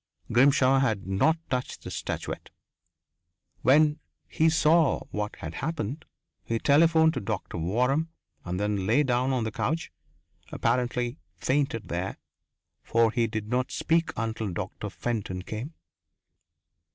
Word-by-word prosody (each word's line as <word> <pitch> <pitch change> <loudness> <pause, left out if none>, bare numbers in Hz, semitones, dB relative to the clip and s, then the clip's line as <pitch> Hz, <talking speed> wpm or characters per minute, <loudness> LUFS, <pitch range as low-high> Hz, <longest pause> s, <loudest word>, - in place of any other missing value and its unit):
Grimshaw 135 +2 +5
had 110 -7 0
not 95 - +2
touched 125 -1 -3
the - - -7
statuette. - - -5 1.1
When 150 +4 +4 0.3
he 160 +1 +3
saw 160 -1 +3
what 105 0 -3
had 80 0 -7
happened, 145 - -3 0.4
he 115 - -1
telephoned 160 +4 +4
to - - -2
Doctor 105 -5 -4
Waram 125 - +1 0.4
and 90 0 -3
then 100 -2 -1
lay 120 +7 +4
down 130 0 +1
on 125 -3 0
the 110 - -2
couch 160 - -2 0.6
apparently 120 +2 0 0.2
fainted 135 -5 -1
there, 90 +2 -3 0.6
for 115 -1 +2
he 115 -1 +1
did 110 -1 -4
not 125 +2 0
speak 165 0 +1
until 110 -3 -2
Doctor 95 +4 -5
Fenton 100 -5 -3
came. 120 - -6
120 Hz, 125 wpm, -27 LUFS, 105-145 Hz, 1.1 s, Grimshaw